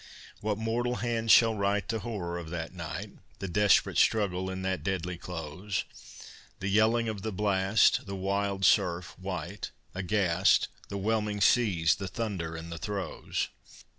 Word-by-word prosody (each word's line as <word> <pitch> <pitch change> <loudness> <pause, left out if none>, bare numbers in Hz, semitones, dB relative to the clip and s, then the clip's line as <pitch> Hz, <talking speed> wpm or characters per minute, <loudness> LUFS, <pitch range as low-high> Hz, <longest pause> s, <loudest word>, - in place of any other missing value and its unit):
What 105 -1 -1
mortal 120 +2 -1
hand 115 -2 -2
shall 115 0 +7
write 100 -1 0
The 115 - 0
horror 95 -6 -4
of 80 -2 -8
that 85 0 -5
night, 85 -4 -6 0.3
The 95 - -5
desperate 105 +2 +3
struggle 95 -4 +2
in 95 0 -4
that 95 -1 -1
deadly 90 -2 -2
close, 90 +3 -4 0.8
The 100 - -2
yelling 110 +3 +3
of 110 -3 -3
the 110 +2 -3
blast, 100 +1 +3
The 100 - -4
wild 100 0 0
surf, 85 0 +2
white, 95 +1 -5 0.2
aghast, 95 -1 +2 0.2
The 100 - -4
whelming 105 0 0
seas, 100 -8 +4
the 95 - -4
thunder 90 -5 -3
and 80 +1 -7
the 85 - -6
throes! 100 -4 -3
100 Hz, 150 wpm, -29 LUFS, 90-105 Hz, 0.8 s, shall